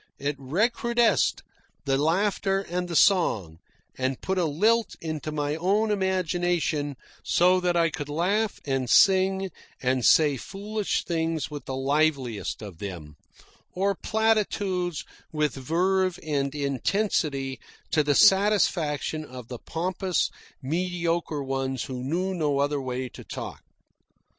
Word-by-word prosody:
It 145 Hz, +1 st, -2 dB
recrudesced 230 Hz, -, +1 dB, 0.4 s
the 135 Hz, -1 st, +2 dB
laughter 195 Hz, +6 st, +1 dB
and 180 Hz, +1 st, -2 dB
the 170 Hz, -, -5 dB
song, 110 Hz, -, +3 dB, 0.4 s
and 130 Hz, 0 st, -2 dB
put 190 Hz, 0 st, -1 dB
a 175 Hz, -, +2 dB
lilt 215 Hz, +9 st, +2 dB
into 155 Hz, -1 st, -4 dB
my 150 Hz, 0 st, -1 dB
own 200 Hz, +6 st, +1 dB
imagination 175 Hz, -6 st, 0 dB, 0.3 s
so 180 Hz, +1 st, +4 dB
that 180 Hz, -1 st, 0 dB
I 165 Hz, -1 st, +3 dB
could 145 Hz, -2 st, -5 dB
laugh 200 Hz, +8 st, 0 dB
and 135 Hz, -3 st, -1 dB
sing 190 Hz, +2 st, +4 dB, 0.3 s
and 130 Hz, -1 st, 0 dB
say 150 Hz, 0 st, +5 dB
foolish 205 Hz, -, -3 dB
things 165 Hz, -2 st, -1 dB
with 145 Hz, -1 st, -7 dB
the 130 Hz, -, -4 dB
liveliest 135 Hz, -6 st, 0 dB
of 95 Hz, -6 st, -9 dB
them, 85 Hz, -7 st, -7 dB, 0.6 s
or 195 Hz, +2 st, +1 dB
platitudes 200 Hz, -5 st, 0 dB, 0.3 s
with 150 Hz, -3 st, 0 dB
verve 180 Hz, +6 st, +1 dB
and 140 Hz, -2 st, -1 dB
intensity 140 Hz, -, -1 dB, 0.3 s
to 155 Hz, -, +3 dB
the 145 Hz, -1 st, +2 dB
satisfaction 180 Hz, -7 st, +3 dB
of 125 Hz, -5 st, -10 dB
the 125 Hz, -2 st, -6 dB
pompous 185 Hz, +2 st, -1 dB, 0.3 s
mediocre 170 Hz, -1 st, -1 dB
ones 135 Hz, -1 st, -2 dB
who 125 Hz, -1 st, -5 dB
knew 180 Hz, +8 st, -1 dB
no 150 Hz, -5 st, 0 dB
other 145 Hz, 0 st, 0 dB
way 130 Hz, 0 st, -3 dB
to -, -, -12 dB
talk. -, -, -7 dB
160 Hz, 130 wpm, -26 LUFS, 140-190 Hz, 0.6 s, say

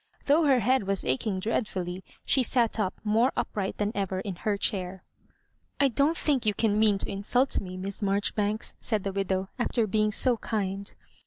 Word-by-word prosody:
Though 305 Hz, +3 st, +4 dB
her 265 Hz, -4 st, +4 dB
head 255 Hz, -1 st, +2 dB
was 195 Hz, -1 st, -1 dB
aching 185 Hz, -, -1 dB
dreadfully, 185 Hz, -4 st, -2 dB, 0.2 s
she 265 Hz, -, +3 dB
sat 235 Hz, -3 st, +1 dB
up 195 Hz, -3 st, 0 dB
more 225 Hz, +4 st, +3 dB
upright 195 Hz, -2 st, -2 dB
than 205 Hz, 0 st, 0 dB
ever 195 Hz, -3 st, -2 dB
in 195 Hz, -2 st, -5 dB
her 205 Hz, +2 st, -1 dB
chair. 190 Hz, -3 st, -1 dB, 0.4 s
" -, -, -44 dB
I 280 Hz, -1 st, +4 dB
don't 285 Hz, +6 st, +2 dB
think 280 Hz, -5 st, +1 dB
you 210 Hz, -1 st, +1 dB
can 215 Hz, -1 st, +1 dB
mean 215 Hz, -2 st, +4 dB
to -, -, -4 dB
insult 245 Hz, +7 st, +1 dB
me, 185 Hz, -2 st, -7 dB
Miss 195 Hz, +2 st, -6 dB
Marjoribanks," 205 Hz, +2 st, -1 dB
said 215 Hz, -4 st, -1 dB
the 195 Hz, -, -3 dB
widow, 190 Hz, -1 st, -1 dB
"after 240 Hz, -1 st, +1 dB
being 215 Hz, +1 st, +1 dB
so 245 Hz, +3 st, +4 dB
kind. 200 Hz, -3 st, -3 dB
210 Hz, 185 wpm, -27 LUFS, 195-230 Hz, 0.4 s, Though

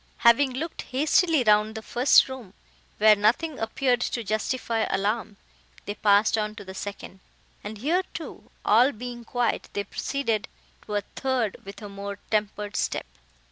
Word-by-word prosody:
Having 255 Hz, +3 st, +6 dB
looked 310 Hz, +6 st, -4 dB
hastily 305 Hz, +2 st, +2 dB
round 215 Hz, 0 st, +3 dB
the 220 Hz, -, -6 dB
first 245 Hz, +4 st, +5 dB
room, 250 Hz, -7 st, -9 dB, 0.4 s
where 215 Hz, 0 st, +7 dB
nothing 245 Hz, +9 st, +1 dB
appeared 245 Hz, +2 st, 0 dB
to 235 Hz, -, -2 dB
justify 225 Hz, +2 st, -1 dB
alarm, 205 Hz, +2 st, -1 dB, 0.5 s
they 205 Hz, -, -3 dB
passed 210 Hz, +1 st, +3 dB
on 215 Hz, 0 st, -2 dB
to 205 Hz, -2 st, -9 dB
the 190 Hz, -, -8 dB
second; 195 Hz, -1 st, -7 dB, 0.4 s
and, 210 Hz, +1 st, -6 dB
here 315 Hz, -, +1 dB
too -, -, -8 dB, 0.2 s
all 240 Hz, +6 st, +5 dB
being 240 Hz, +1 st, -7 dB
quiet, 245 Hz, +1 st, -1 dB
they 205 Hz, -, -1 dB
proceeded 225 Hz, 0 st, -2 dB, 0.4 s
to 210 Hz, -, -3 dB
a 205 Hz, -, +1 dB
third 255 Hz, -6 st, -1 dB
with 200 Hz, +2 st, -10 dB
a -, -, -5 dB
more 200 Hz, 0 st, -6 dB
tempered 210 Hz, -1 st, -1 dB
step. -, -, -1 dB
220 Hz, 155 wpm, -26 LUFS, 205-255 Hz, 0.5 s, where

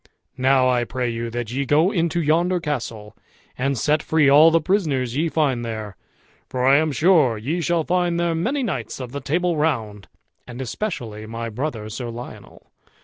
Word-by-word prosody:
Now 130 Hz, 0 st, +4 dB
I 125 Hz, -1 st, +2 dB
pray 125 Hz, 0 st, -2 dB
you, 115 Hz, 0 st, -4 dB
that 120 Hz, -1 st, -4 dB
ye 135 Hz, +3 st, -1 dB
go 155 Hz, +7 st, +3 dB
into 170 Hz, -3 st, 0 dB
yonder 170 Hz, +4 st, +2 dB
castle, 115 Hz, -9 st, -5 dB, 0.4 s
and 135 Hz, +1 st, -1 dB
set 150 Hz, +5 st, +1 dB
free 155 Hz, -2 st, +2 dB
all 150 Hz, +4 st, +7 dB
the 165 Hz, 0 st, +3 dB
prisoners 150 Hz, -, 0 dB
ye 160 Hz, +3 st, +1 dB
find 140 Hz, -7 st, 0 dB
there, 110 Hz, -3 st, -5 dB, 0.5 s
for 125 Hz, 0 st, -1 dB
I 135 Hz, +1 st, +6 dB
am 155 Hz, 0 st, +1 dB
sure 150 Hz, -, +3 dB
ye 150 Hz, +11 st, -2 dB
shall 170 Hz, +1 st, +1 dB
find 175 Hz, 0 st, 0 dB
there 170 Hz, -1 st, +1 dB
many 250 Hz, -, -1 dB
knights 145 Hz, -, -4 dB
of 125 Hz, -2 st, -6 dB
the 140 Hz, +1 st, -5 dB
Table 170 Hz, +4 st, 0 dB
Round, 110 Hz, -, -1 dB, 0.4 s
and 120 Hz, 0 st, -9 dB
especially 120 Hz, -, -5 dB
my 115 Hz, +1 st, -5 dB
brother 115 Hz, -2 st, -4 dB
Sir 120 Hz, +3 st, -5 dB
Lionel. 120 Hz, +1 st, -10 dB
140 Hz, 180 wpm, -22 LUFS, 120-165 Hz, 0.5 s, all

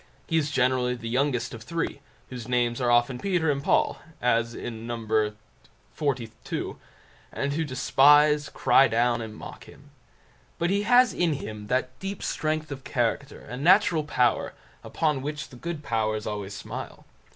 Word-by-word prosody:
He 165 Hz, -, -2 dB
is 155 Hz, -2 st, +2 dB
generally 125 Hz, -2 st, +1 dB
the 115 Hz, -1 st, -7 dB
youngest 125 Hz, -1 st, 0 dB
of 115 Hz, -, -8 dB
three, 145 Hz, +4 st, -3 dB, 0.3 s
whose 125 Hz, -3 st, -7 dB
names 120 Hz, 0 st, 0 dB
are 120 Hz, -, +2 dB
often 120 Hz, +1 st, +3 dB
Peter 175 Hz, -4 st, +1 dB
and 140 Hz, -1 st, -3 dB
Paul, -, -, +2 dB, 0.2 s
as 115 Hz, -1 st, +1 dB
in 115 Hz, -1 st, -6 dB
No. 120 Hz, 0 st, -3 dB, 1.0 s
xlii, 130 Hz, -7 st, -3 dB, 0.6 s
and 140 Hz, 0 st, -2 dB
who 160 Hz, +2 st, 0 dB
despise, 145 Hz, +2 st, +4 dB
cry 135 Hz, -, +4 dB
down, 120 Hz, +1 st, +1 dB
and 110 Hz, -1 st, -7 dB
mock -, -, -10 dB
him. -, -, -16 dB, 0.7 s
But 170 Hz, +2 st, 0 dB
he 200 Hz, +1 st, +2 dB
has 245 Hz, -3 st, +6 dB
in 170 Hz, -3 st, +1 dB
him 105 Hz, -7 st, -6 dB
that 130 Hz, +1 st, -1 dB
deep 195 Hz, +1 st, -5 dB
strength 155 Hz, 0 st, -2 dB
of 135 Hz, -1 st, -6 dB
character 130 Hz, +4 st, -2 dB
and 125 Hz, +3 st, -7 dB
natural 175 Hz, -2 st, +5 dB
power 125 Hz, -5 st, +1 dB, 0.3 s
upon 150 Hz, -4 st, 0 dB
which 150 Hz, +2 st, -5 dB
the 125 Hz, -, -13 dB
good 160 Hz, +3 st, -5 dB
powers 110 Hz, -3 st, -1 dB
always 105 Hz, -2 st, -4 dB
smile. -, -, -8 dB
130 Hz, 160 wpm, -26 LUFS, 120-150 Hz, 1.0 s, has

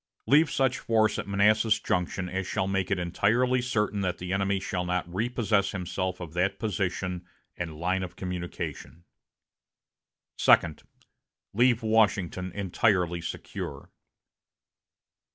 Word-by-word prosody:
Leave 150 Hz, +2 st, +5 dB
such 130 Hz, -2 st, +1 dB
force 110 Hz, -1 st, +2 dB
at -, -, -5 dB
Manassas 105 Hz, +2 st, +3 dB
Junction 90 Hz, -1 st, -1 dB
as 95 Hz, +1 st, -3 dB
shall 95 Hz, -, -1 dB
make 95 Hz, -1 st, -1 dB
it 100 Hz, -, +1 dB
entirely 115 Hz, +8 st, +1 dB
certain 105 Hz, -5 st, -1 dB
that 90 Hz, -2 st, -1 dB
the 90 Hz, +1 st, -4 dB
enemy 100 Hz, 0 st, +1 dB
shall 90 Hz, -1 st, -3 dB
not 90 Hz, 0 st, -1 dB
repossess 105 Hz, +1 st, 0 dB
himself 95 Hz, 0 st, -3 dB
of 85 Hz, -3 st, -8 dB
that 95 Hz, +3 st, 0 dB
position 95 Hz, -3 st, -2 dB, 0.3 s
and 80 Hz, -3 st, -5 dB
line 95 Hz, +2 st, 0 dB
of 90 Hz, -1 st, -6 dB
communication." 90 Hz, -2 st, -6 dB, 1.4 s
"Second. 80 Hz, -3 st, +4 dB, 0.7 s
Leave 120 Hz, +1 st, +3 dB
Washington 100 Hz, -5 st, +1 dB
entirely 90 Hz, -3 st, +1 dB
secure." -, -, -6 dB
95 Hz, 120 wpm, -27 LUFS, 90-110 Hz, 1.4 s, Leave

